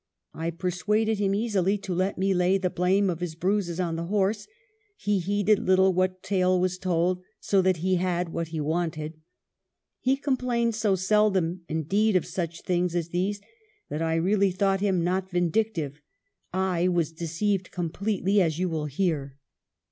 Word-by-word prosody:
I 165 +1 -3
persuaded 200 +5 0
him 195 -1 +1
easily 205 -3 +1
to 195 -2 -5
let 185 +3 0
me 195 +1 +2
lay 180 +1 +3
the 185 -2 -1
blame 190 +3 +2
of 170 -3 -1
his 175 -3 -4
bruises 180 0 -1
on 170 -3 -1
the 165 - -3
horse: 205 +2 0 0.5
he 205 -1 0
heeded 205 +3 +2
little 190 0 +4
what 185 0 0
tale 185 -2 +2
was 180 0 0
told 180 0 0 0.2
so 195 -1 +2
that 185 -1 +2
he 185 -1 +3
had 180 -1 -1
what 165 0 -3
he 160 0 -5
wanted. 155 0 -2 0.8
He 265 +1 +1
complained 250 -4 0
so 215 -3 +1
seldom, 190 -2 +2
indeed, 190 +7 +1
of 185 - +2
such 170 -2 -4
things 180 -1 0
as 170 -1 -1
these 190 +4 -1 0.5
that 150 - -3
I 165 0 +1
really 195 +4 +2
thought 195 +1 +1
him 190 -4 +1
not 185 +2 -1
vindictive; 175 -4 -1 0.5
I 185 -1 +1
was 170 -3 +1
deceived 175 +4 -2
completely, 195 +3 0
as 160 -3 +1
you 185 +1 0
will 160 -2 -2
hear." 145 -3 -2
185 Hz, 165 wpm, -26 LUFS, 170-200 Hz, 0.8 s, little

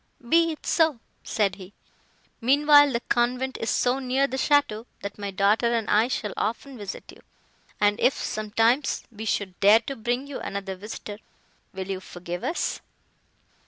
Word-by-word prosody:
"Be 330 +4 +4
it 310 - -9
so," 320 -7 +2 0.2
said 200 -3 0
he, 190 0 -12 0.7
"meanwhile 290 +3 +6
the 235 -1 -1
convent 250 +3 0
is 225 - -1
so 250 +2 +1
near 265 +1 +1
the 265 - -4
château, 265 -6 +2 0.2
that 200 +1 -6
my 200 -1 -3
daughter 205 +5 +2
and 225 -2 -1
I 215 +3 +4
shall 210 -5 -3
often 235 +6 -3
visit 205 -4 -8
you; - - -17 0.6
and 205 +1 +2
if, 260 - +4
sometimes, 225 +6 0
we 220 0 -8
should 200 -3 -2
dare 210 +3 +6
to 275 +4 -5
bring 240 +3 -2
you 280 -2 -6
another 195 -1 -5
visitor—will 205 -1 -10
you 195 -1 -3
forgive 175 -1 -7
us?" 340 - -2
225 Hz, 160 wpm, -25 LUFS, 205-265 Hz, 0.7 s, meanwhile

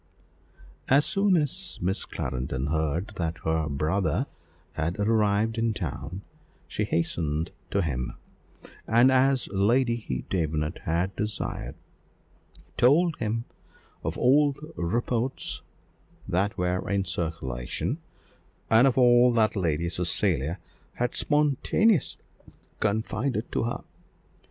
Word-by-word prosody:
As 140 +3 +5
soon 195 -2 +3
as 160 +5 -2
Miss 95 +3 -1
Clarendon 65 +2 -3
heard 80 +5 -1
that 85 -1 -2
her 80 -1 0
brother 80 +7 0 0.5
had 80 +2 -2
arrived 110 +1 +2
in 115 -1 +1
town 90 +2 -5 0.4
she - - -2
hastened 80 -1 -1 0.2
to 100 0 +1
him, 65 -6 -2 0.7
and, 120 +4 +5
as 130 0 +3
Lady 110 - +1
Davenant 80 -2 -1
had 85 +4 0
desired, 105 -1 -3 1.0
told 155 +6 +4
him 115 +1 -2 0.6
of - - -3
all 140 +3 +4
the 155 +3 -12
reports 120 +8 -1 0.7
that 100 +4 0
were 90 +1 -1
in 100 0 +1
circulation, 80 - -3 0.7
and 115 +4 +7
of 130 - +1
all 125 -1 +6
that 110 -2 +2
Lady 85 -3 0
Cecilia 85 -3 +1 0.4
had 125 0 -1
spontaneously 150 - +2 0.6
confided 110 +3 -1
to - - 0
her. 120 - -3
100 Hz, 110 wpm, -27 LUFS, 85-125 Hz, 1.0 s, and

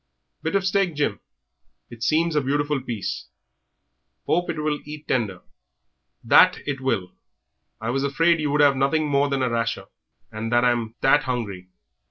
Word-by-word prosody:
"Bit 160 +4 -2
of 195 -1 +1
steak, 190 -3 +1
Jim. 145 0 -1 0.7
It 120 -1 -11
seems 160 +6 +1
a 150 - +3
beautiful 145 +1 0
piece. 115 -6 -5 1.0
Hope 175 +2 0
it 165 - -2
will 150 -1 -1
eat 150 +1 -10
tender." 105 -8 -1 0.8
"That - - +6
it 140 -2 -3
will. 95 -9 -1 0.7
I 115 +2 -2
was 135 +2 -1
afeard 165 +4 +2
you 150 -1 -1
would 145 +1 +2
have 140 -2 +5
nothing 140 +3 +1
more 140 0 +2
than 135 -2 0
a 125 - +1
rasher, 115 -4 -1 0.5
and 110 +1 -5
I'm 120 -2 +1
that 140 +1 +3
'ungry." 100 -8 -4
140 Hz, 160 wpm, -23 LUFS, 120-150 Hz, 1.0 s, That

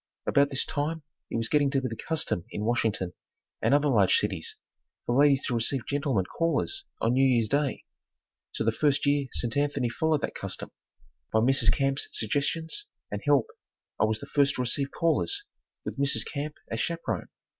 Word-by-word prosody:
About 140 0 +4
this 135 -1 +1
time 155 +2 -2 0.3
it - - -2
was 115 0 0
getting 145 +2 +3
to 135 0 +1
be 130 - -2
the 115 - -5
custom 155 - -1
in 105 - -4
Washington 110 -6 0 0.5
and - - +2
other 145 +1 +4
large 105 -9 +4
cities 95 -6 -2 0.5
for 120 - 0
ladies 140 -2 +4
to 125 - -1
receive 120 +2 0
gentlemen 140 -9 0
callers 165 - -1
on 115 +2 +2
New 130 +1 +4
Year's 120 -4 +3
Day, 140 +4 0 0.7
so - - -2
the - - +3
first 145 -1 +2
year 140 -1 +2
St. 120 +1 -1
Anthony 145 -3 +1
followed 155 +4 +1
that - - -2
custom, - - -5 0.6
by - - +2
Mrs. 120 0 +4
Camp's 135 +1 0
suggestions 160 - -1 0.2
and - - -3
help, - - +4 0.5
I - - +5
was 110 0 0
the - - -8
first 140 -1 +2
to - - -1
receive 135 +3 0
callers, 170 - 0 0.4
with - - -5
Mrs. 140 0 +3
Camp 150 +1 -4 0.2
as 115 - -2
chaperone. 170 0 -2
140 Hz, 180 wpm, -28 LUFS, 115-145 Hz, 0.7 s, I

